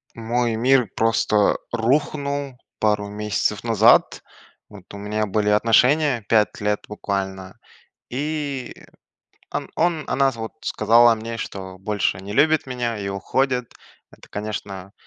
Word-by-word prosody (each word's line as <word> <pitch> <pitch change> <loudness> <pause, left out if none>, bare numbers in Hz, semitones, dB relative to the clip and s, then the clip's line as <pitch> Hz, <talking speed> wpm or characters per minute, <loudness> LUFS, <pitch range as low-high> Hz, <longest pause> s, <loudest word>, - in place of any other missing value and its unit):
Мой 115 0 -1
мир 125 0 +3
просто 110 -2 +2 0.2
рухнул 140 +2 -1 0.2
пару 105 -1 +1
месяцев 105 0 -2
назад. 115 0 +4 0.5
Вот, 100 -3 -13
у 100 - -8
меня 105 +1 -2
были 105 +1 0
отношения, 120 +5 +3
5 110 -2 +2
лет 105 0 0
буквально. 95 -2 -4 0.5
И, 140 -1 -3 0.8
ан - - -4
он 165 -2 +1
она, 135 0 +3
вот, 115 -2 -6
сказала 120 +1 +4
мне, 115 +1 -6
что 95 -4 -7
больше 100 -1 -1
не 100 +2 -7
любит 155 +6 +3
меня 120 -3 -3
и 100 - -5
уходит. 125 +5 -1 0.4
Это, - - -18
конечно, 100 -2 -6
115 Hz, 125 wpm, -22 LUFS, 105-125 Hz, 0.8 s, назад